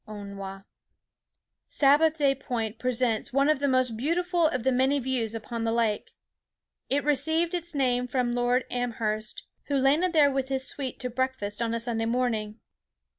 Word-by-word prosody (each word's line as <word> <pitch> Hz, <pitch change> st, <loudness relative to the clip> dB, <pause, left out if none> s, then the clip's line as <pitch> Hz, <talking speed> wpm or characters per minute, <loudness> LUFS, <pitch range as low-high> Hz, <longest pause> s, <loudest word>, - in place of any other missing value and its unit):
—ONTWA. 200 Hz, -2 st, -8 dB, 1.0 s
Sabbath 300 Hz, +3 st, +4 dB
day 280 Hz, -2 st, +3 dB
Point 235 Hz, -5 st, -4 dB
presents 250 Hz, -3 st, 0 dB
one 275 Hz, +3 st, +2 dB
of 305 Hz, -, +2 dB
the 285 Hz, -, +1 dB
most 255 Hz, -3 st, +2 dB
beautiful 340 Hz, -, +1 dB
of 255 Hz, -6 st, -2 dB
the 265 Hz, -, +2 dB
many 260 Hz, +3 st, +2 dB
views 245 Hz, -4 st, -2 dB
upon 225 Hz, +1 st, -5 dB
the 225 Hz, -, 0 dB
lake. 225 Hz, -2 st, 0 dB, 0.8 s
It 285 Hz, +2 st, +1 dB
received 320 Hz, +4 st, +1 dB
its 345 Hz, -2 st, -3 dB
name 250 Hz, -2 st, +1 dB
from 250 Hz, -1 st, 0 dB
Lord 245 Hz, +1 st, +1 dB
Amherst, 220 Hz, -3 st, -2 dB, 0.2 s
who 285 Hz, -, 0 dB
landed 295 Hz, +7 st, +2 dB
there 295 Hz, -3 st, +5 dB
with 265 Hz, -1 st, -2 dB
his 265 Hz, -1 st, 0 dB
suite 270 Hz, -4 st, -3 dB
to 250 Hz, -1 st, -3 dB
breakfast 240 Hz, -4 st, -2 dB
on 230 Hz, 0 st, 0 dB
a -, -, -1 dB
Sunday 230 Hz, -1 st, -1 dB
morning. 225 Hz, -3 st, -1 dB
255 Hz, 165 wpm, -27 LUFS, 230-280 Hz, 1.0 s, there